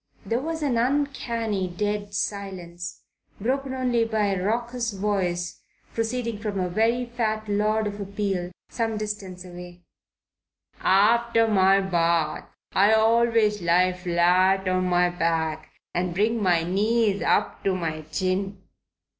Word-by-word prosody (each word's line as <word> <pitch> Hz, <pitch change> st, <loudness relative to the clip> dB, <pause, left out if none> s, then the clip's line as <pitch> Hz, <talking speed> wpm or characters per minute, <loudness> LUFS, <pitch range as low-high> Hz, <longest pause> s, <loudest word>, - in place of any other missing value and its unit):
There 230 Hz, +1 st, 0 dB
was 320 Hz, +3 st, -4 dB
an 250 Hz, -5 st, +1 dB
uncanny, 235 Hz, -7 st, -1 dB
dead 205 Hz, +2 st, -3 dB
silence, 180 Hz, -4 st, -5 dB, 0.4 s
broken 260 Hz, +4 st, -1 dB
only 250 Hz, -3 st, +1 dB
by 220 Hz, -2 st, 0 dB
a 180 Hz, -1 st, -2 dB
raucous 235 Hz, +2 st, -1 dB
voice 185 Hz, -3 st, -2 dB, 0.3 s
proceeding 230 Hz, -1 st, -2 dB
from 210 Hz, -2 st, -3 dB
a 180 Hz, -1 st, -1 dB
very 230 Hz, +6 st, +1 dB
fat 220 Hz, -3 st, -2 dB
Lord 215 Hz, +1 st, +1 dB
of 205 Hz, 0 st, -4 dB
Appeal 195 Hz, -3 st, -2 dB, 0.2 s
some 225 Hz, -2 st, -2 dB
distance 200 Hz, -4 st, -5 dB
away: 175 Hz, 0 st, -11 dB, 1.0 s
"After 230 Hz, +3 st, +3 dB
my 195 Hz, -2 st, +4 dB
bath 170 Hz, -4 st, 0 dB, 0.2 s
I 205 Hz, +3 st, +5 dB
always 225 Hz, -2 st, +3 dB
lie 180 Hz, +2 st, +3 dB
flat 180 Hz, +2 st, +2 dB
on 185 Hz, 0 st, +1 dB
my 180 Hz, 0 st, +2 dB
back 160 Hz, -2 st, -1 dB, 0.2 s
and 175 Hz, -1 st, -1 dB
bring 220 Hz, +3 st, +1 dB
my 175 Hz, -4 st, +3 dB
knees 205 Hz, +3 st, +1 dB
up -, -, +1 dB
to 195 Hz, -1 st, +2 dB
my 160 Hz, -3 st, -3 dB
chin." 190 Hz, +4 st, -1 dB
200 Hz, 130 wpm, -25 LUFS, 180-225 Hz, 1.0 s, I